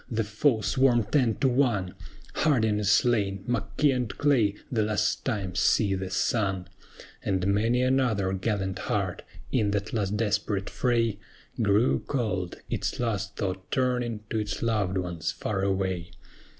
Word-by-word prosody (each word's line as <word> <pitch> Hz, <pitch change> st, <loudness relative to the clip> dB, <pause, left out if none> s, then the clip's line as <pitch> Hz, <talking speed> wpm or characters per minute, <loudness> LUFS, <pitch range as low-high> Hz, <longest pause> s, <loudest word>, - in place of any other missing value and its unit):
The 115 Hz, -1 st, 0 dB
foe 110 Hz, +3 st, +1 dB
swarm 125 Hz, -1 st, +3 dB
ten 115 Hz, +1 st, +2 dB
to 135 Hz, -, +4 dB
one: 120 Hz, -8 st, +1 dB, 0.4 s
HARDIN 110 Hz, -9 st, +2 dB
is 105 Hz, -2 st, 0 dB
slain; 105 Hz, -4 st, +2 dB
MCKEE 135 Hz, +3 st, +1 dB
and 125 Hz, -4 st, -3 dB
CLAY 120 Hz, -9 st, +3 dB, 0.2 s
the 115 Hz, -4 st, +1 dB
last 105 Hz, 0 st, 0 dB
time 100 Hz, -8 st, -2 dB
see 100 Hz, +3 st, +3 dB
the 95 Hz, -1 st, -3 dB
sun: 95 Hz, -1 st, 0 dB, 0.6 s
And 95 Hz, -2 st, 0 dB
many 115 Hz, +5 st, +2 dB
another 125 Hz, -7 st, +1 dB
gallant 95 Hz, -1 st, -2 dB
heart, -, -, -1 dB, 0.3 s
in 110 Hz, -5 st, +2 dB
that 100 Hz, +1 st, -2 dB
last 105 Hz, -2 st, 0 dB
desperate 105 Hz, -2 st, -1 dB
fray, 115 Hz, -4 st, +1 dB, 0.4 s
Grew 105 Hz, +3 st, +3 dB
cold, 100 Hz, -10 st, -2 dB
its -, -, -2 dB
last 105 Hz, -5 st, -2 dB
thought 95 Hz, -1 st, -4 dB
turning 125 Hz, -4 st, 0 dB
to 110 Hz, -, 0 dB
its 105 Hz, -, -3 dB
loved 105 Hz, -5 st, 0 dB
ones 85 Hz, -3 st, -2 dB
far 100 Hz, -3 st, -3 dB
away. 95 Hz, -3 st, -1 dB
105 Hz, 145 wpm, -27 LUFS, 95-120 Hz, 0.6 s, to